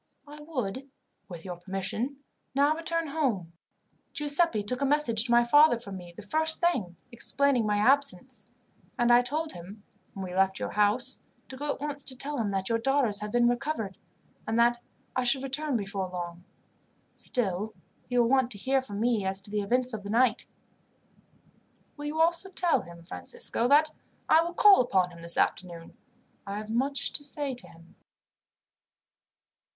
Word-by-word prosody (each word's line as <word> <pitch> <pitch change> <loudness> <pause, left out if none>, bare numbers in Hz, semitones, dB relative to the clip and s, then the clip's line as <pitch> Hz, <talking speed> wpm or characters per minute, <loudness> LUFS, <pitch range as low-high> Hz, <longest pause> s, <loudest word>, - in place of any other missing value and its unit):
I 295 +1 -11
would, 270 -4 -4 0.4
with 170 -1 -9
your 180 -2 -6
permission, 205 +9 -4 0.3
now 285 +2 +4
return 330 0 -2
home. 235 - -1 0.6
Giuseppi 295 -6 +2
took 250 +6 -3
a - - +2
message 245 -6 +2
to 240 - -2
my 240 0 +6
father 290 +2 +5
from 200 -4 -9
me, 175 -1 -11
the 215 - -9
first 315 +8 +1
thing, 215 - 0
explaining 255 0 +1
my 210 0 +1
absence; 250 -2 +2 0.5
and 240 0 +4
I 240 - +7
told 305 +6 -2
him, 190 +5 -11 0.3
when 195 - -5
we 180 - -7
left 190 +1 +2
your - - -4
house, 210 +4 +1 0.3
to 260 - -8
go 290 +3 -5
at - - -2
once 290 -1 -4
to 260 - 0
tell 280 +2 -4
him 215 -3 0
that 195 -1 -2
your 230 0 +1
daughters 245 -4 +1
had 210 0 -5
been 240 +1 +3
recovered, 240 -5 -2 0.5
and 225 - 0
that 240 0 +3 0.3
I 255 - +1
should 260 +2 +2
return 275 0 0
before 195 -2 -4
long. 175 -1 -7 0.7
Still, 210 -2 0 0.3
he 245 - -1
will 240 -1 +4
want 260 -1 +3
to - - -10
hear 265 +6 +1
from 205 -6 -7
me 230 -2 +1
as 190 0 0
to 200 - -12
the 210 0 0
events 250 +4 +3
of 215 - -4
the 200 - -8
night." 235 +1 +2 1.5
"Will 290 - -8
you 305 +2 -3
also 340 +3 +3
tell 355 -2 +2
him, 170 0 -13
Francisco, 240 - -2
that 300 +3 +5 0.4
I 320 - +6
will 340 +1 -4
call 405 -4 +7
upon 185 -7 +1
him 170 -1 -13
this 170 0 -2
afternoon. 170 -3 -2 0.5
I 200 +1 -4
have 215 +1 -6
much 275 +4 -1
to 290 - -2
say 285 -1 -2
to 250 - -8
him." 165 0 -18
240 Hz, 175 wpm, -28 LUFS, 200-285 Hz, 1.5 s, I